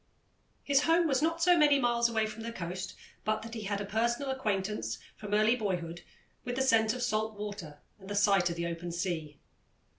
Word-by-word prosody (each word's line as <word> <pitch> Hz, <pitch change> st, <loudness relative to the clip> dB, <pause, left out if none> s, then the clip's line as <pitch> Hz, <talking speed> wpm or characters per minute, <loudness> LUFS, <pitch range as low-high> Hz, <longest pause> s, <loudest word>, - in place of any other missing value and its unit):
His 280 Hz, 0 st, +3 dB
home 330 Hz, +1 st, +4 dB
was 270 Hz, -2 st, +1 dB
not 330 Hz, +1 st, +1 dB
so 355 Hz, +1 st, +6 dB
many 295 Hz, -3 st, +5 dB
miles 240 Hz, -2 st, +2 dB
away 220 Hz, -1 st, +1 dB
from 215 Hz, +1 st, -7 dB
the 230 Hz, +1 st, -4 dB
coast 185 Hz, -2 st, -5 dB, 0.3 s
but 215 Hz, +1 st, -1 dB
that 230 Hz, 0 st, -8 dB
he 220 Hz, -3 st, -5 dB
had 200 Hz, 0 st, -1 dB
a 205 Hz, -, -3 dB
personal 235 Hz, +6 st, 0 dB
acquaintance, 210 Hz, -5 st, -2 dB, 0.2 s
from 210 Hz, -1 st, -8 dB
early 215 Hz, +3 st, +4 dB
boyhood, 175 Hz, -6 st, -3 dB, 0.4 s
with 245 Hz, 0 st, -3 dB
the 265 Hz, -, +1 dB
scent 225 Hz, -3 st, +3 dB
of 250 Hz, -, -3 dB
salt 220 Hz, -2 st, -1 dB
water 200 Hz, -8 st, -6 dB, 0.2 s
and 190 Hz, 0 st, -12 dB
the 205 Hz, -, -3 dB
sight 200 Hz, -3 st, +4 dB
of 170 Hz, -, -3 dB
the 170 Hz, 0 st, -2 dB
open 170 Hz, 0 st, -4 dB
sea. 170 Hz, -4 st, -3 dB
215 Hz, 205 wpm, -31 LUFS, 190-245 Hz, 0.4 s, so